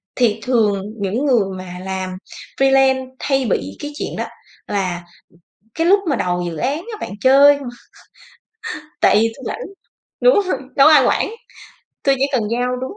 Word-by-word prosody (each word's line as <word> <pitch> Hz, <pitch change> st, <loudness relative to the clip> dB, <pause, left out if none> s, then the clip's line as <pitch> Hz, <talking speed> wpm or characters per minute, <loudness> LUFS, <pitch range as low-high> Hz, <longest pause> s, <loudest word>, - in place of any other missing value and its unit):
Thì 225 Hz, -4 st, +2 dB
thường 215 Hz, -6 st, +1 dB, 0.2 s
những 205 Hz, +8 st, -1 dB
người 245 Hz, -7 st, +3 dB
mà 185 Hz, -1 st, -8 dB
làm 190 Hz, -1 st, -3 dB, 0.5 s
freelance 270 Hz, -1 st, +3 dB
hay 270 Hz, -2 st, 0 dB
bị 95 Hz, -, -1 dB
cái 290 Hz, -, -6 dB
chuyện -, -, -4 dB
đó, -, -, -2 dB, 0.4 s
là 185 Hz, -4 st, -2 dB, 0.7 s
cái 330 Hz, +1 st, 0 dB
lúc 400 Hz, +2 st, +5 dB
mà 280 Hz, -, +2 dB
đầu 180 Hz, -4 st, -1 dB
dự 170 Hz, -, -5 dB
án 270 Hz, -, -1 dB
á, 430 Hz, +6 st, -8 dB
bạn -, -, -5 dB
chơi 280 Hz, +2 st, +6 dB
không: 280 Hz, -2 st, -8 dB, 1.3 s
"Tại -, -, +5 dB
vì 225 Hz, +2 st, +4 dB
tui -, -, -11 dB
rảnh, -, -, -4 dB, 0.6 s
đúng -, -, +5 dB
hông? 370 Hz, -, 0 dB, 0.2 s
Đâu 275 Hz, -, +7 dB
có -, -, +6 dB
ai 285 Hz, -4 st, +6 dB
quản, -, -, +1 dB, 0.7 s
tui 275 Hz, -, +4 dB
chỉ 270 Hz, -, +2 dB
cần 255 Hz, -4 st, +1 dB
giao 250 Hz, +1 st, 0 dB
đúng 260 Hz, +5 st, -5 dB
260 Hz, 175 wpm, -19 LUFS, 205-280 Hz, 1.3 s, Đâu